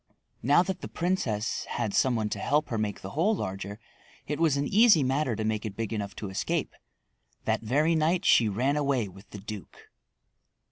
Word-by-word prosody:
Now 145 +8 +5
that 185 0 -4
the - - -5
princess 125 - -1
had 115 -4 -3
some 130 -2 +3
one 110 -2 0
to - - -3
help 150 +2 +1
her 115 - -1
make 105 -2 -2
the 95 - -6
hole 195 +9 +2
larger 100 - -5 0.5
it 150 +1 -3
was 160 -4 +3
an 140 0 0
easy 210 - +6
matter 130 -2 0
to 110 0 -3
make 110 -1 -1
it 105 -3 -5
big 115 -1 -3
enough 100 -2 -4
to 100 - -5
escape. 95 - -2 0.7
That - - +1
very 145 +9 +2
night 165 +4 +1
she 115 - +5
ran 130 +8 +1
away 140 -6 +1
with 95 +2 -14
the - - -9
duke. 105 0 -10
120 Hz, 195 wpm, -28 LUFS, 105-155 Hz, 0.7 s, easy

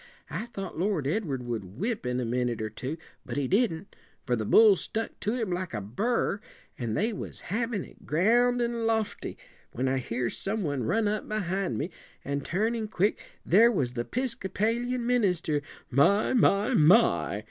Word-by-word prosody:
I 190 - -3
thought 195 -7 -6
Lord 185 -6 0
Edward 145 - -1
would 110 -5 -5
whip 215 - -2
in 125 0 0
a 125 - -1
minute 120 0 -1
or 110 -1 -3
two; 130 +8 -5 0.3
but - - -5
he 140 -2 0
didn't, 200 - 0 0.3
for 125 - +1
the 110 -3 -3
bull 215 - +7
stuck 225 +4 -4
to 215 +3 -1
him 225 -6 -2
like 175 -6 -3
a - - -1
burr, 200 - -1 0.3
and 115 -3 -3
they 220 +3 +1
was - - -7
havin' 230 -3 -1
it, - - -18
ground 240 +9 +3
and 235 -1 -1
lofty, 220 -2 -1 0.4
when 130 +2 -1
I 130 0 +1
hears 120 -1 -2
some 210 +1 -2
one 145 -5 -1
run 220 - +1
up 210 +1 -2
behind 195 -3 -1
me, 165 +6 -3 0.3
an' 140 +1 -1
turnin' 220 - -1
quick, 205 0 0 0.2
there 225 +7 +6
was 130 - -1
the 120 -1 -2
'piscopalian 235 - -1
minister. 180 -11 +1 0.3
'My! 170 - +4
my! 210 -1 +3
my!' 200 +6 +4
195 Hz, 175 wpm, -28 LUFS, 135-225 Hz, 0.4 s, bull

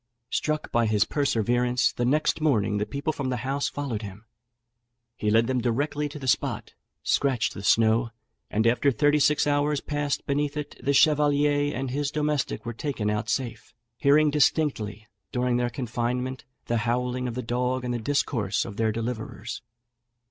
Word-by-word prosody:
Struck 155 0 -1
by 120 -1 +2
his 105 -2 +3
perseverance, 125 -3 +1
the 120 - -1
next 150 +4 +1
morning 105 -9 +2
the 105 - -1
people 145 +3 -2
from 135 -3 -3
the 125 - -1
house 140 +2 0
followed 135 -7 -4
him; 105 +1 -9 0.9
he 105 - -1
led 115 +2 +4
them 130 0 0
directly 145 +5 -1
to 145 - -8
the 135 -3 -6
spot, 115 - 0 0.3
scratched 135 -5 +1
the - - -7
snow, 115 +3 +3 0.4
and 110 +2 0
after 125 +4 +3
thirty 145 +5 +3
six 150 +1 +3
hours 145 0 +1
passed 145 -1 -2
beneath 145 +1 -1
it, 150 -1 -5
the 140 - +2
chevalier 145 0 +3
and 130 0 -3
his 145 +1 -1
domestic 150 -2 -1
were 120 - -3
taken 115 -5 -2
out 105 +1 -2
safe, 120 0 -3 0.2
hearing 145 +4 +4
distinctly 135 -8 +1 0.3
during 125 -1 +1
their 120 0 0
confinement 125 +1 -3 0.2
the 120 - 0
howling 125 +3 -1
of 120 - -4
the 125 - -3
dog 125 +2 -1
and 125 - -1
the 120 - -2
discourse 110 -5 0
of 100 - -8
their 110 -1 +2
deliverers. 115 -1 -5
125 Hz, 170 wpm, -26 LUFS, 115-145 Hz, 0.9 s, led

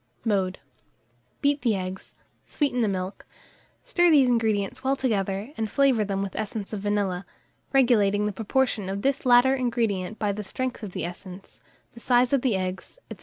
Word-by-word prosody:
Mode. 190 -4 0 0.8
Beat 285 0 +2
the 235 -4 +2
eggs, 185 0 -6 0.3
sweeten 275 -5 0
the 225 - +2
milk; 185 -1 -4 0.6
stir 350 -8 +3
these 285 -5 +6
ingredients 220 -2 0
well 265 +1 +2
together, 205 -1 -2
and 220 -1 -2
flavour 270 -3 +3
them 195 -1 -2
with 195 - -6
essence 215 -1 -4
of 210 - -2
vanilla, 200 -3 -1 0.5
regulating 210 -6 +3
the 210 - 0
proportion 220 -1 0
of 195 +1 -4
this 275 -1 0
latter 245 +2 +6
ingredient 230 -6 -1
by 210 -2 0
the 210 +1 -5
strength 255 +6 -4
of 205 -4 -7
the - - -3
essence, 180 +2 -10 0.3
the 235 - -12
size 245 +2 +2
of 275 - +3
the 245 -6 +1
eggs, 185 - -4 0.2
&c. - - -29
215 Hz, 170 wpm, -25 LUFS, 195-255 Hz, 0.8 s, these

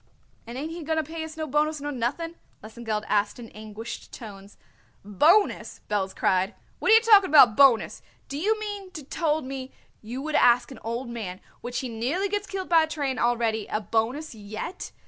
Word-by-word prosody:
"And 235 +2 -7
ain't 305 +4 -4
he 340 +1 -6
going 320 +1 -1
to 315 - +1
pay 320 +2 -6
us 320 0 -8
no 315 - -2
bonus 305 +1 0
nor 290 +1 -4
nothing?" 280 +7 -2 0.3
Lesengeld 220 -1 -4
asked 205 +2 +1
in 235 -2 -10
anguished 215 +2 -8
tones. 200 -3 -11 0.5
"Bonus!" 315 - +2
Belz 195 -2 -1
cried; 190 +3 +1 0.2
"what - - 0
are 440 - +9
you 450 - +7
talking 420 -4 +6
about, 260 -7 +7
bonus? 270 -5 +4 0.3
Do 280 - -5
you 430 +6 +1
mean 410 -3 -5
to 310 -5 -7
told 310 +1 -1
me 265 0 -6 0.3
you 235 +4 -6
would 310 0 -4
ask 240 -2 +4
an 265 - -10
old 235 +3 -3
man 215 -6 -6 0.2
which 245 0 -3
he 260 - -4
nearly 255 - -1
gets 410 0 -2
killed 385 -2 -4
by 335 -2 +5
a 315 - +1
train 285 -4 -2
already 230 -3 +1
a 215 - -1
bonus 230 +8 -1
yet? 215 - -7
260 Hz, 195 wpm, -26 LUFS, 225-320 Hz, 0.5 s, are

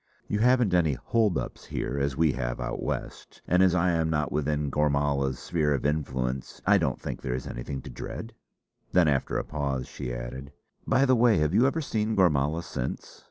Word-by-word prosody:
You 105 - -1
haven't 120 -4 +4
any 85 -5 +3
'hold 110 - +1
ups' - - -5
here 70 - -3
as 70 -1 -1
we 80 -2 +4
have - - -3
Out - - -3
West; - - -5
and 90 +2 +4
as 95 -2 +4
I 90 +1 +3
am 80 -1 +1
not 75 -2 0
within 75 -1 -1
Gormala's 70 -2 +1
sphere 75 -4 0
of 70 - -4
influence, 65 -4 -2
I 100 0 +5
don't 70 -7 -1
think - - -5
there 65 -2 -2
is 65 - -5
anything 65 +2 -5
to - - -8
dread!" 115 +1 -7 0.6
Then 90 -3 +5
after 70 -3 +1
a - - -1
pause 70 -4 -3
she 60 - -6
added: 65 +4 -6 0.3
"By 135 +1 +4
the 130 -1 +4
way 115 -3 +4
have 75 0 +1
you 125 - +5
ever 160 +4 0
seen 110 -5 -1
Gormala 80 -3 +2
since?" 65 -7 -5
75 Hz, 200 wpm, -27 LUFS, 70-90 Hz, 0.6 s, I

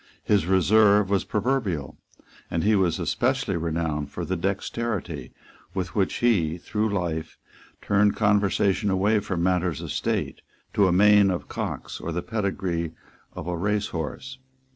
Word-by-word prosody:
His 100 -5 +2
reserve 100 +2 +4
was 100 - +1
proverbial; 105 - -1 0.5
and 80 - -1
he 105 +1 +4
was 95 -4 +2
especially 130 -5 0
renowned 80 -3 -2
for - - -5
the 95 - -1
dexterity 95 - -3 0.4
with 90 -2 -3
which 100 -3 0
he, 90 -10 +2
through 105 +5 -1
life, 85 -5 -3 0.5
turned 105 0 +3
conversation 100 -1 +2
away 100 +3 +2
from 95 -4 -3
matters 90 -4 +1
of - - -6
state - - -2 0.3
to 100 -2 +4
a - - +2
main 100 +2 +6
of 90 -2 -3
cocks - - -5
or 85 - -4
the 90 +2 -3
pedigree 95 -6 -2 0.4
of - - -7
a 90 0 -2
racehorse. 105 - -3
95 Hz, 140 wpm, -25 LUFS, 85-105 Hz, 0.5 s, main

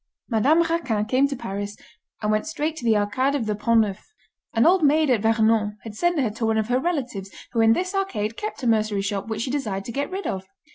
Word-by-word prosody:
Madame 275 +9 +4
Raquin 285 -11 -1
came 260 +5 +3
to 280 - -4
Paris, 205 -3 -5 0.5
and 210 - +1
went 215 +7 0
straight 315 0 -2
to 260 - -7
the 225 -2 +3
Arcade 260 +7 +1
of 255 -6 -1
the 215 - 0
Pont 230 +2 +3
Neuf. 205 - -4 0.4
An 225 - +2
old 365 +2 +5
maid 300 0 +4
at 230 -5 +2
Vernon 220 -1 +2
had 225 - -7
sent 345 +8 +1
her 245 -6 +1
to 225 +2 -3
one 220 0 +1
of 220 +1 -1
her 250 +1 +2
relatives 255 - -2 0.2
who 230 - +1
in 225 0 +6
this 365 - -2
arcade 230 - -1
kept 425 - -6
a - - 0
mercery 215 -3 +1
shop 200 0 -3
which 220 0 -2
she 255 - -3
desired 210 -9 -2
to - - -5
get 280 +4 -2
rid 385 +2 -5
of. 190 0 -3
230 Hz, 240 wpm, -24 LUFS, 210-285 Hz, 0.5 s, in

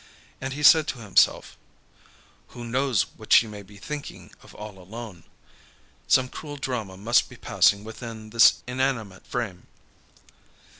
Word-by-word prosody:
And 130 0 -4
he 150 +2 -6
said 155 +1 +7
to - - -3
himself: 105 -5 +2 1.0
"Who 120 - -7
knows 130 -2 +1
what - - -13
she - - +7
may 105 -2 -9
be 100 +1 -16
thinking 150 +2 -8
of - - -16
all 105 -2 -9
alone? 100 -1 -10 0.8
Some 130 -1 +4
cruel 145 +2 -8
drama 115 -8 -4
must 115 +5 +2
be - - -12
passing 100 0 +2
within 110 -1 -9
this 115 -1 +5
inanimate 125 -6 -3
frame." 105 -8 -4
115 Hz, 140 wpm, -25 LUFS, 105-130 Hz, 1.0 s, said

